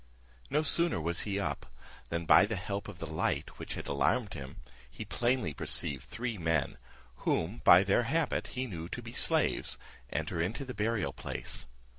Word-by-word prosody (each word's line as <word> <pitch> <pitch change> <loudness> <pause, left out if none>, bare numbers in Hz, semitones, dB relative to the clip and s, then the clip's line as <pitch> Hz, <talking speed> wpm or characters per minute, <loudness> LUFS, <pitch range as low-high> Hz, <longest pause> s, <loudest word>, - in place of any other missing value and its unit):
No 150 +2 +2
sooner 170 - +2
was 85 +2 +1
he 100 0 0
up, 100 - -3 0.4
than 85 0 -2
by 100 - +7
the 110 - -2
help 100 +2 -4
of 105 -4 -8
the 80 - -4
light 80 0 -2
which - - -5
had - - -6
alarmed 95 - +1
him, 70 -3 -7 0.3
he - - -7
plainly 120 - 0
perceived 70 -2 0
three 115 -1 -4
men, 80 -3 0 0.4
whom, 90 +8 -1
by 90 +2 +9
their 100 +4 +3
habit, 165 -1 +1
he 130 - 0
knew 85 -7 -6
to - - -5
be - - -8
slaves, - - +2 0.3
enter 80 - -2
into 105 - -2
the 130 - -5
burial 110 0 0
place. - - -5
100 Hz, 175 wpm, -32 LUFS, 80-120 Hz, 0.4 s, by